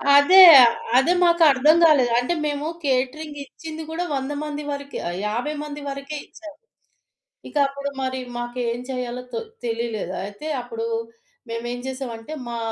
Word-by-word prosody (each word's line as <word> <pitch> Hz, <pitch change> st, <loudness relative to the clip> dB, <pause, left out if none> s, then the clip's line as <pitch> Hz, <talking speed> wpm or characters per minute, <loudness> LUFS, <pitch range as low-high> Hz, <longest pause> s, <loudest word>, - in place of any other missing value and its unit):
అదే. 360 Hz, +7 st, +7 dB, 0.2 s
ఆహ్, 235 Hz, -1 st, +5 dB, 0.2 s
అదే 300 Hz, +7 st, +4 dB
మాకర్థం 315 Hz, -3 st, +5 dB
గాలేదు. 280 Hz, -7 st, +5 dB
అంటే 250 Hz, +8 st, -1 dB
మేము 290 Hz, +1 st, -2 dB, 0.2 s
కేటరింగ్ 290 Hz, +3 st, -2 dB
ఇచ్చింది 320 Hz, +2 st, -9 dB
గూడా 335 Hz, +2 st, -3 dB
100 270 Hz, +1 st, -3 dB
మంది 300 Hz, 0 st, -5 dB
వరకే 280 Hz, 0 st, -6 dB
ఆహ్, 175 Hz, -, -5 dB
50 245 Hz, +8 st, -2 dB
మంది 295 Hz, 0 st, -7 dB
వరకే 275 Hz, +2 st, -6 dB
ఇచ్చాం. 310 Hz, -3 st, -12 dB, 1.0 s
ఇక -, -, -15 dB
అప్పుడు 280 Hz, +1 st, -5 dB
మరి 260 Hz, 0 st, -2 dB, 0.2 s
మాకేం 240 Hz, 0 st, -3 dB
చేయాలో 250 Hz, -1 st, -4 dB
తో 460 Hz, -, -2 dB, 0.2 s
తెలిలేదు. 230 Hz, -5 st, -3 dB
అయితే 205 Hz, +9 st, -9 dB, 0.2 s
అప్పుడు 230 Hz, -2 st, -5 dB, 0.6 s
మేమేం 240 Hz, +1 st, -4 dB
చేసామంటే 255 Hz, -1 st, -6 dB, 0.2 s
మా 235 Hz, -, -4 dB
270 Hz, 140 wpm, -22 LUFS, 240-300 Hz, 1.0 s, అదే